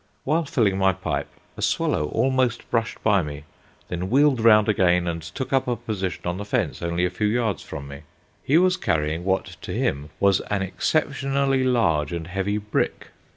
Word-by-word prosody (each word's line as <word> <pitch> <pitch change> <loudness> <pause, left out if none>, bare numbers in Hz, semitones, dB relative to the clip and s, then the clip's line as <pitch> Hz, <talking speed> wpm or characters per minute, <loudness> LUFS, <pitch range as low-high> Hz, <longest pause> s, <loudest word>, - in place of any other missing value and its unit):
While 160 +4 +1
filling 105 -8 +1
my 95 0 +4
pipe, 80 -6 -3 0.3
a - - -8
swallow 75 - +1
almost 130 - 0
brushed 115 -2 -1
by 100 -3 +4
me, 75 -2 -6 0.4
then 90 +1 -4
wheeled 135 0 +4
round 110 -2 +6
again, 90 -4 +3
and 85 -1 -2
took 120 - -6
up 130 -1 +2
a 120 - +1
position 95 -6 -4
on 90 +2 -2
the - - -3
fence 105 - -1
only 85 +1 0
a 90 - -1
few 105 +3 -1
yards 110 -5 0
from 70 -1 -8
me. 70 +1 -9 0.4
He 145 - +3
was 185 +1 +3
carrying 80 - -1
what 95 0 0 0.2
to - - -6
him 70 +2 -1
was 100 -1 +4
an 100 -2 0
exceptionally 135 - 0
large 100 - +2
and 85 -1 -4
heavy 95 +4 -2
brick. 105 0 -2
100 Hz, 185 wpm, -24 LUFS, 85-125 Hz, 0.4 s, round